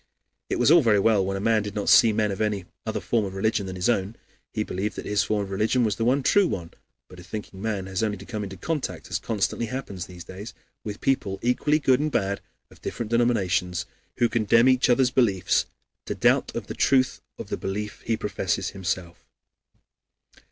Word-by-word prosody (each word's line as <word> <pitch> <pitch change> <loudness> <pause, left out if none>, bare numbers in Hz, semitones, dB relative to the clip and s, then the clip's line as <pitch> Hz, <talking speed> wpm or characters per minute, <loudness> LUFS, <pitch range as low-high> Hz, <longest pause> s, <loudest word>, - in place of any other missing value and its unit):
It - - 0
was 125 +4 +4
all 170 0 +8
very 110 -6 +4
well 105 -1 +3
when 95 +1 -2
a - - -3
man 110 +1 +2
did 105 -1 -6
not 105 - -2
see 115 - +7
men 105 -1 +1
of 100 - -4
any 105 -4 -1 0.2
other - - -1
form 115 -2 0
of 95 -1 -5
religion 100 0 0
than 95 - -5
his 90 0 -1
own; 105 -2 0 0.4
he - - -1
believed 100 +4 -3
that - - -6
his 105 0 +1
form 105 -1 0
of 100 - -8
religion 110 +6 +1
was 105 -3 0
the 115 - -1
one 130 +4 +2
true 200 +5 +4
one. 85 - -4 0.4
But 90 - -13
a - - -11
thinking 95 +1 -7
man 105 -3 -2
has 95 +1 -3
only 105 -2 0
to 100 - -11
come 105 -2 -4
into 95 -1 -7
contact 155 - -4
as - - 0
constantly 115 +1 -1
happens 110 -7 -5
in 90 - -12
these 85 - -9
days 100 +4 -9 0.3
with 105 0 -6
people, 105 -8 0
equally 135 +5 +2
good 130 -4 +3
and 155 +1 -1
bad, 100 -5 0 0.3
of - - -18
different 115 -2 -5
denominations, 95 -7 +1 0.3
who 120 - +4
condemn 115 +1 +3
each 130 -1 +4
other's 125 0 +4
beliefs, 100 -8 +2 0.4
to - - -2
doubt - - +2
of - - -3
the - - -6
truth 130 -2 +2 0.2
of - - -8
the - - -1
belief 105 +2 -4
he 115 -1 0
professes 95 -2 -2
himself. 90 -2 -4
105 Hz, 215 wpm, -25 LUFS, 95-120 Hz, 0.4 s, all